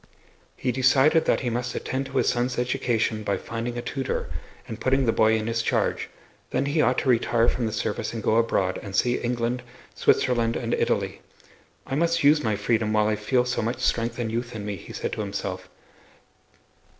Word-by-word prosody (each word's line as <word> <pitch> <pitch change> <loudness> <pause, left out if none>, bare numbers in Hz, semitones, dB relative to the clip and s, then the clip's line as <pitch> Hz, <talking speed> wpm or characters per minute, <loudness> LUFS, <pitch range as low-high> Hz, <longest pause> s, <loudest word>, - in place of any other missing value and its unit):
He 125 - 0
decided 135 +5 +4
that - - +2
he 125 -3 -1
must 120 +1 -2
attend 135 +1 -3
to 135 0 -4
his - - +2
son's 125 +1 0
education 120 -3 0
by 100 -2 -1
finding 115 +4 -4
a 120 - -4
tutor 135 -2 -3 0.4
and 110 - -7
putting 135 0 +2
the 115 - +3
boy 110 0 +3
in 110 - -3
his 115 0 0
charge, - - 0 0.4
then 140 - 0
he 150 +2 +1
ought - - +2
to 135 - 0
retire 120 -1 +3
from 120 -2 0
the - - -3
service 105 - -2
and 115 -2 -5
go 110 - +3
abroad, 95 -5 +1
and 100 -2 -7
see 120 +4 +2
England, 120 +1 -1 0.3
Switzerland 115 -2 +2
and 115 0 -2
Italy. - - 0 0.6
"I - - -6
must 170 +3 +1
use 150 +1 +5
my 110 -3 +1
freedom 110 +1 0
while 105 0 +3
I 110 - +1
feel 125 +4 +1
so 125 -1 -1
much 115 +2 -2
strength 115 -1 0
and 115 -2 -2
youth 120 +1 -3
in 105 -2 -5
me," 105 -1 -3
he 90 - -11
said - - -3
to - - -3
himself. - - -4
120 Hz, 200 wpm, -25 LUFS, 110-130 Hz, 0.6 s, use